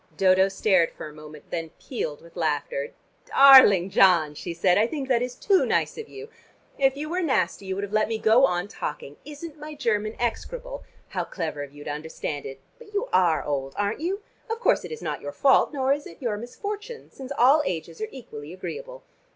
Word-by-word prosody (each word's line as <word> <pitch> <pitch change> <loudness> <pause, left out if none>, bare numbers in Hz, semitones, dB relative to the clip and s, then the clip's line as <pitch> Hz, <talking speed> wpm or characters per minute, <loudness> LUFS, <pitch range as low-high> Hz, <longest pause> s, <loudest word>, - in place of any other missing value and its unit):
Dodo 190 0 +5
stared 190 -3 +2
for - - -8
a 150 - -11
moment, 150 0 -13
then 165 -1 -3
pealed 155 - -5
with 170 - -17
laughter. 145 -4 -2 0.3
"Darling 255 -10 +8
John," 170 -7 +5
she 170 +4 -6
said, 180 +2 +2
"I 215 +3 +3
think 275 -1 -4
that 245 -3 +2
is 250 0 -3
too 390 -3 +3
nice - - 0
of 455 -1 -8
you. 425 +2 -9 0.5
If 270 0 +3
you 300 +2 -4
were 355 +4 -1
nasty 200 - 0
you 190 - -2
would 200 - -3
have 200 +1 -6
let 215 0 +3
me 225 0 -2
go 220 +4 +4
on 175 +2 -2
talking. 150 -6 -6
Isn't 300 +1 -9
my 300 0 -8
German 215 -6 -1
execrable? - - -4 0.3
How - - -2
clever 160 -5 -4
of 140 -1 -7
you 145 0 -12
to 145 - -4
understand 150 -1 -5
it! 135 0 -9 0.2
But 425 -3 -14
you 435 +5 -1
are 175 -4 +3
old, 135 -2 -3
aren't 205 +3 -1
you? 380 +6 -3 0.3
Of 450 0 -2
course - - +2
it - - -8
is 465 - -7
not - - -3
your - - -5
fault, 275 -2 +4
nor 270 -2 +1
is 290 +1 -5
it - - -14
your 235 -5 -1
misfortune, 415 - -7
since 265 0 -10
all 275 +5 +6
ages 165 0 -5
are 215 - -2
equally 165 - -10
agreeable. - - -7
215 Hz, 210 wpm, -25 LUFS, -, 0.5 s, Darling